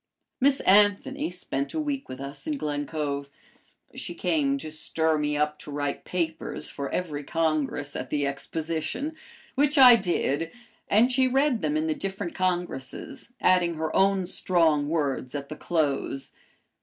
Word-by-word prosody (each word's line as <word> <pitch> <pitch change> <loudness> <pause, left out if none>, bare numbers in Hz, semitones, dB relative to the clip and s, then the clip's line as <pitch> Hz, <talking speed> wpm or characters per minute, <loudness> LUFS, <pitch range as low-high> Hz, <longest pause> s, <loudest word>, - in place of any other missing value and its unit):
Miss 275 +1 +3
Anthony 210 +8 +3
spent 160 - -4
a - - 0
week 285 -3 -3
with 130 - -7
us 140 - -8
in 300 -2 -1
Glen 145 - -2
Cove. 140 -2 -3 0.6
She - - -5
came 280 -3 +1
to 155 - -6
stir 160 0 0
me 150 0 0
up 150 0 0
to - - -9
write 145 0 -3
papers 160 -3 -2
for 140 -1 -4
every 150 -5 -3
Congress 155 -3 -1
at 130 - -4
the 145 -1 0
Exposition, 160 - -3 0.4
which 290 +2 +2
I 255 -3 +10
did, 165 -6 0 0.4
and 230 +5 +4
she 260 +1 +3
read 265 -1 +2
them 155 -1 0
in 155 - 0
the 160 - +1
different 195 0 -4
Congresses, 180 - -3
adding 180 -2 +3
her 160 0 -3
own 195 -1 +3
strong 160 -5 +2
words 145 -4 -1
at 140 -1 -5
the 155 - -5
close. 145 -5 -1
165 Hz, 155 wpm, -27 LUFS, 145-205 Hz, 0.6 s, I